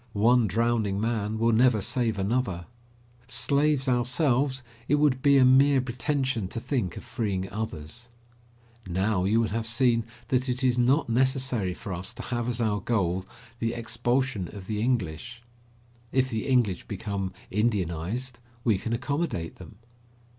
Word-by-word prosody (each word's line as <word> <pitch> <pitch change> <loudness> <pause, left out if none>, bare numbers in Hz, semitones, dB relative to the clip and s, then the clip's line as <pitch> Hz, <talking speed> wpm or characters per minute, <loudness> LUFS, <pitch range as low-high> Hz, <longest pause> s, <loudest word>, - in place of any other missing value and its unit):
One 120 +2 +4
drowning 110 -1 0
man 110 -1 -1
will 115 +1 +2
never 120 0 +4
save 115 +2 0
another. 100 -3 -1 0.6
Slaves 140 +1 +2
ourselves, 130 +1 +1 0.2
it 145 - +3
would 145 -3 +2
be 140 0 +5
a 130 - +6
mere 135 +2 +5
pretension 130 - -1
to 115 - -5
think 115 - -2
of - - -7
freeing 95 -4 -2
others. 110 +2 -6 0.8
Now 95 +1 0
you 110 +4 +3
will 115 -2 +1
have 115 +2 -2
seen 115 0 +2 0.3
that 130 0 +1
it 125 +1 -1
is 125 -1 +2
not 130 +6 +3
necessary 125 -5 +1
for 100 -4 -6
us 90 +2 -4
to - - -7
have 120 -1 -2
as 120 -1 -2
our 105 -3 +1
goal 95 -4 0 0.3
the 115 0 -1
expulsion 120 -2 -1
of 100 0 -10
the 105 +1 -3
English. 115 0 -2 0.7
If 130 0 +1
the 110 -1 -2
English 120 -9 +1
become 100 -2 -3 0.2
Indianised, 105 +3 -1 0.2
we 110 -5 +2
can 115 +3 -3
accommodate 125 - -2
them. 110 - -12
115 Hz, 150 wpm, -27 LUFS, 100-130 Hz, 0.8 s, a